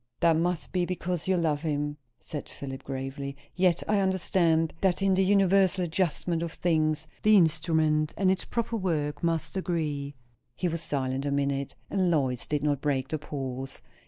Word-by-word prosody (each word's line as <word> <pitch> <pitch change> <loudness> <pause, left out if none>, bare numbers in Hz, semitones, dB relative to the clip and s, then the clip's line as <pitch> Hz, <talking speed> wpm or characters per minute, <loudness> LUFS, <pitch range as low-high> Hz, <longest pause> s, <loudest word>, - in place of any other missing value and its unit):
"That 165 -1 +5
must 170 +1 -1
be 180 -1 +1
because 180 -1 -2
you 190 -1 +3
love 155 -4 +1
him," 145 -2 -2 0.2
said 150 - -7
Philip 135 -1 -7
gravely. 135 +1 -5 0.2
"Yet 180 -2 +2
I 210 -1 +3
understand, 170 -4 +2
that 190 -2 +2
in 195 -1 +4
the 190 +1 +3
universal 195 -1 +4
adjustment 170 0 0
of 170 -1 -3
things, 155 -2 +1 0.2
the 215 0 +6
instrument 155 -2 +2
and 190 -2 +3
its 190 - -1
proper 230 -1 -2
work 150 -7 -1
must 165 +2 -1
agree." 150 -6 -2 0.4
He 180 - -1
was 165 -1 -2
silent 135 -2 -2
a - - 0
minute, 140 -1 -1 0.2
and 185 -2 +2
Lois 130 -7 0
did 150 -1 -1
not 145 -2 +1
break 135 -3 0
the 155 - -2
pause. 135 -2 -5
160 Hz, 170 wpm, -28 LUFS, 145-180 Hz, 0.4 s, the